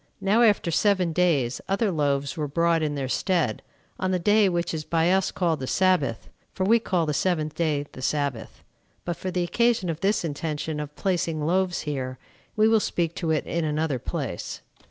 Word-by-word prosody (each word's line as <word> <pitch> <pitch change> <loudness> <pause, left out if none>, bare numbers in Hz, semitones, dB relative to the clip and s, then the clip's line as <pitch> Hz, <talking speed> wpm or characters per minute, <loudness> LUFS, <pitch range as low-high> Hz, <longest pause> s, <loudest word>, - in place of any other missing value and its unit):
Now 200 +4 +2
after 210 -7 +3
seven 185 -1 +2
days 150 -9 +1
other 200 +1 +1
loaves 140 -3 0
were 150 -3 -2
brought 165 +2 +2
in 150 -1 -1
their 135 -2 -2
stead, 165 - 0 0.4
on 185 - 0
the 185 - +1
day 205 +3 +4
which 175 -1 -1
is 155 -1 -3
by 165 +2 +1
us 190 0 +2
called 165 -4 0
the 130 - -4
Sabbath; 165 -12 +1 0.3
for 190 - -1
we 225 +5 +4
call 180 -6 0
the 150 - -1
seventh 155 -2 0
day 150 -4 0
the - - -10
Sabbath. 140 -4 -2 0.4
But 175 - -2
for 185 - -5
the 180 -1 -1
occasion 220 -1 +1
of 160 - -6
this 195 -1 +1
intention 150 0 -3
of 150 0 -6
placing 165 -5 -1
loaves 180 +2 +1
here, 130 -3 -4 0.4
we 215 0 +4
will 225 0 +4
speak 170 -5 -1
to 165 - -2
it 155 -2 +1
in 170 0 -2
another 150 -3 -1
place. - - -5
170 Hz, 195 wpm, -25 LUFS, 150-185 Hz, 0.4 s, day